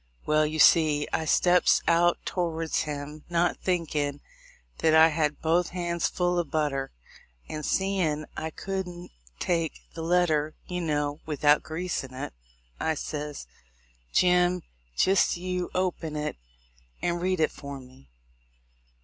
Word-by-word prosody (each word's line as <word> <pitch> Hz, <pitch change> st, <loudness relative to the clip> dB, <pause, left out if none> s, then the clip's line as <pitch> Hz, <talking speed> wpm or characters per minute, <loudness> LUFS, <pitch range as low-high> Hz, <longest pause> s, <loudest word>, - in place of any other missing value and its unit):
Well, 155 Hz, 0 st, +3 dB
you 155 Hz, +1 st, -4 dB
see, 155 Hz, -2 st, +5 dB
I 160 Hz, -, 0 dB
steps 175 Hz, +3 st, +4 dB
out 170 Hz, +1 st, +4 dB
towards 165 Hz, -3 st, -1 dB
him, 150 Hz, 0 st, -6 dB
not 175 Hz, 0 st, +1 dB
thinkin' 150 Hz, -5 st, -1 dB, 0.6 s
that 160 Hz, -1 st, +4 dB
I 160 Hz, +1 st, +8 dB
had 150 Hz, -1 st, -1 dB
both 165 Hz, +2 st, +2 dB
hands 170 Hz, -1 st, -1 dB
full 175 Hz, 0 st, 0 dB
of 165 Hz, -4 st, -2 dB
but 155 Hz, -1 st, +1 dB
ter; 135 Hz, -1 st, -3 dB, 0.6 s
and 155 Hz, 0 st, -5 dB
seein' 180 Hz, -5 st, 0 dB
I 160 Hz, -, -3 dB
couldn't 180 Hz, -1 st, -5 dB, 0.3 s
take 165 Hz, -, 0 dB, 0.2 s
the 165 Hz, -, -6 dB
letter, 160 Hz, -3 st, +2 dB
you 180 Hz, 0 st, -4 dB
know, 145 Hz, -2 st, -1 dB
without 150 Hz, -1 st, +3 dB
greasin' 160 Hz, -5 st, -4 dB
it, 130 Hz, -, -5 dB, 0.5 s
I 160 Hz, -, 0 dB
ses, 150 Hz, -, -5 dB, 0.7 s
"Jim, 180 Hz, 0 st, +3 dB, 0.3 s
jist 190 Hz, -1 st, +3 dB
you 180 Hz, 0 st, -3 dB
open 175 Hz, -4 st, -1 dB
it, 150 Hz, 0 st, -2 dB, 0.7 s
and 175 Hz, 0 st, 0 dB
read 185 Hz, 0 st, 0 dB
it 155 Hz, -, +2 dB
for 140 Hz, -1 st, -8 dB
me." 125 Hz, -, -17 dB
160 Hz, 135 wpm, -27 LUFS, 150-175 Hz, 0.7 s, I